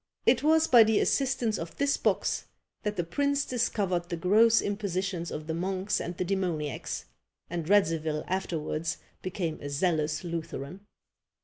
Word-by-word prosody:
It - - +4
was 315 +1 +4
by 240 -6 +8
the 220 -1 +3
assistance 255 -5 +1
of 165 0 -7
this 280 0 +2
box - - 0 0.4
that 210 0 -2
the 175 - 0
prince 280 - 0
discovered 195 -8 -1
the 170 - -2
gross 220 +6 +5
impositions 195 -3 -2
of 150 - -5
the 160 - -3
monks 185 +3 -1
and 175 +1 -5
the 185 - -1
demoniacs, 175 -7 -2 0.5
and 170 -1 -3
Radzivil 160 -6 +2
afterwards 165 -3 -2 0.2
became 175 -4 -3
a 145 - -5
zealous 155 +1 0
Lutheran. 170 +2 -6
185 Hz, 145 wpm, -29 LUFS, 165-210 Hz, 0.5 s, by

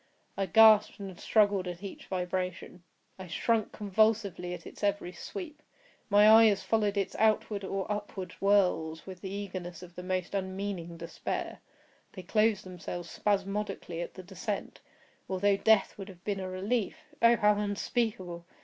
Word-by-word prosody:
I 195 -1 -1
gasped 215 +3 +6
and 195 -3 -8
struggled 205 -4 +2
at 175 +2 -6
each 200 - -8
vibration. 180 -1 -3 0.4
I 185 - -7
shrunk 220 +5 0
convulsively 205 -3 +1
at - - -13
its - - -11
every 200 -3 0
sweep. 310 - -8 0.5
My 205 +1 +6
eyes 220 -3 +7
followed 210 0 +1
its 195 -1 -1
outward 215 -2 +2
or 195 0 -2
upward 205 -3 -4
whirls 180 -5 +2
with 185 -2 -9
the 190 - -5
eagerness 185 -3 -6
of 180 -1 -12
the 180 - -7
most 185 0 -3
unmeaning 190 -3 -4
despair; 170 0 -4 0.5
they 185 - -8
closed 215 +2 +2
themselves 175 -1 -7
spasmodically 195 -4 -2
at 175 - -6
the 185 - -9
descent, 195 +3 -5 0.5
although 195 +1 +2
death 215 0 +3
would 195 0 -7
have 180 -2 -14
been 200 -2 -2
a 185 -1 -4
relief, 200 +4 -1 0.2
oh, 235 0 +7
how 210 -1 +3
unspeakable! 205 -4 -2
195 Hz, 150 wpm, -30 LUFS, 180-210 Hz, 0.5 s, eyes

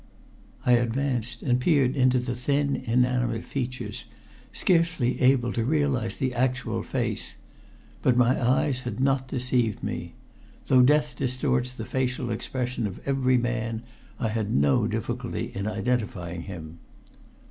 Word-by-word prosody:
I 125 - +4
advanced 120 0 0
and 125 -2 +2
peered 135 -2 +3
into 130 -1 +4
the 125 0 -1
thin 140 +3 +1
inanimate 125 -1 +1
features, 130 -2 -4 0.5
scarce 170 -2 +2
able 125 0 +2
to 115 - 0
realize 135 -4 0
the 130 -1 -1
actual 125 +1 0
fact. - - -3 0.6
But 125 -1 +3
my 125 +1 +3
eyes 130 +1 +2
had 125 0 -5
not 135 0 +1
deceived 125 -3 0
me. - - -4 0.5
Though 130 - +5
death 150 +3 +3
distorts 125 -1 0
the 115 -3 -7
facial 125 -1 -1
expression 125 +1 -2
of 95 - -7
every 130 -2 +3
man, 115 -2 -2 0.4
I 115 - 0
had 110 -1 -2
no 70 0 +3
difficulty - - -3
in 100 +1 -3
identifying 105 -8 -2
him. 85 -4 -8
125 Hz, 135 wpm, -26 LUFS, 115-130 Hz, 0.6 s, Though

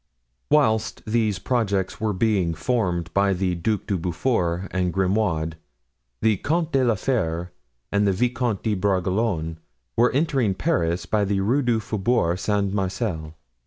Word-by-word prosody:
Whilst 110 -8 +2
these 110 -3 +1
projects 100 -7 -1
were 110 -1 +1
being 95 -4 +1
formed 90 -10 -1
by 100 0 +3
the 90 0 0
Duc 100 +5 -1
de 100 - -1
Beaufort 90 0 -1
and 90 -1 0
Grimaud, 90 -4 0 0.7
the 110 -2 +3
Comte 160 - -1
de 135 -2 +3
la 120 -3 +3
Fere 90 -7 -1 0.4
and 100 0 +2
the - - +4
Vicomte 120 +1 0
de 110 - +1
Bragelonne 95 -3 0 0.4
were 120 +2 +4
entering 135 - +1
Paris 90 - 0
by 105 -1 +1
the 100 0 0
Rue 120 +9 +2
du 120 -3 +1
Faubourg 105 -4 0
Saint 100 -1 0
Marcel. 95 -5 -2
100 Hz, 145 wpm, -24 LUFS, 90-115 Hz, 0.7 s, the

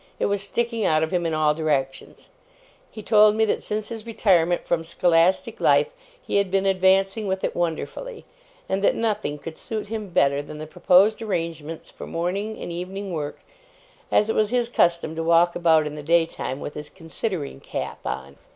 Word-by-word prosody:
It - - 0
was 200 -1 0
sticking 230 +2 -1
out 155 -3 +3
of 160 - -2
him 175 -2 0
in 160 - -1
all 155 -1 +3
directions. 145 -4 -3 0.6
He 215 - -10
told 210 0 +5
me 220 0 +3
that 210 - -1
since 210 0 -2
his 225 -2 -6
retirement 180 -6 +2
from 165 -1 0
scholastic 170 +2 +2
life, 470 - +4 0.4
he - - 0
had 200 -1 +1
been 195 +1 +1
advancing 195 +2 +2
with 190 0 -2
it - - -1
wonderfully; 175 - -4 0.4
and 190 +1 -1
that - - +3
nothing 210 -10 -1
could 160 +3 -9
suit 215 -2 -5
him 215 -2 -4
better 140 -4 +2
than 145 +1 -9
the 155 - -6
proposed 190 +7 +3
arrangements 165 -6 -4
for - - -9
morning 195 +6 -3
and - - -6
evening 185 +2 -5
work, 150 -3 -4 0.7
as 210 - +3
it 220 - 0
was 215 -1 +2
his 240 0 0
custom 170 -7 +1
to 165 - -2
walk 170 +1 +3
about 160 -3 +3
in 150 - -4
the 150 - -7
daytime 165 -4 0
with 145 - -6
his 150 0 -8
considering 165 -4 -5
cap - - -5
on. 65 +2 -5
175 Hz, 190 wpm, -24 LUFS, 160-210 Hz, 0.7 s, told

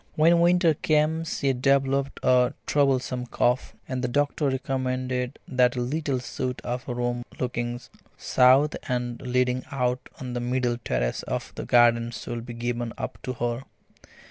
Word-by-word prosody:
When 165 +2 +5
winter 175 -1 +4
came 155 +1 +1
she 140 -4 0
developed 135 +1 +1
a 125 +1 +4
troublesome 130 -3 +1
cough, 125 +1 0
and 130 -1 -3
the - - +1
doctor 145 +3 +1
recommended 130 -1 -2
that 125 -1 +3
a - - -2
little 140 +1 -1
suite 125 0 -4
of 125 +1 -4
rooms 120 -1 -2 0.2
looking 120 -1 -2 0.4
south 130 +4 +4
and 120 -1 -2
leading 125 0 0
out 125 -2 -1
on 125 -1 -5
the 120 - -2
middle 120 0 0
terrace - - -1
of - - -4
the - - -6
garden 120 -1 +4
should 120 0 -6
be 120 - -6
given 120 0 -3
up - - -5
to 130 - -4
her. 120 0 -2
125 Hz, 150 wpm, -26 LUFS, 120-135 Hz, 0.4 s, When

